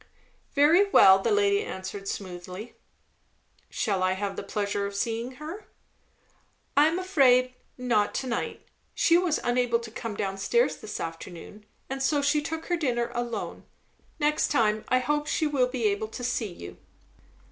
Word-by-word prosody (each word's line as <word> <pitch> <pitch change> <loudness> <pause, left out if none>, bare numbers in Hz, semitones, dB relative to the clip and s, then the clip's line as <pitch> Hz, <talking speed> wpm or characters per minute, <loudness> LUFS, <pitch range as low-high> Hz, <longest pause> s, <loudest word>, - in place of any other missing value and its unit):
"Very 330 +8 +5
well!" 190 - +7
the - - -1
lady 410 0 +3
answered 190 - -6
smoothly. 185 +3 -6 1.0
"Shall 200 -6 -1
I 185 0 +2
have 195 +1 -3
the - - -4
pleasure 200 0 -2
of 200 - -8
seeing 230 +4 -2
her?" 315 +10 -8 1.1
"I 290 +2 +6
am 325 +2 0
afraid, 260 -9 +3 0.2
not 235 -5 +1
to - - -2
night. 235 -2 -3 0.3
She 335 - +4
was 350 -3 +2
unable 245 -1 +2
to 230 -1 -9
come 225 -1 -5
down 195 -1 -3
stairs 475 - +2
this - - -7
afternoon, 175 +5 -8 0.2
and 270 0 -4
so 285 +1 +1
took 300 +3 0
her 350 - 0
dinner 240 -7 -1
alone. 235 -3 -4 0.5
Next 300 -1 +1
time, 215 -5 +1
I 255 - +3
hope, 295 +4 0
she 315 - 0
will 280 -4 +2
be 250 -2 -4
able 205 +1 +1
to 245 +3 -8
see 240 -3 -1
you." 90 - -10
245 Hz, 160 wpm, -27 LUFS, 205-295 Hz, 1.1 s, well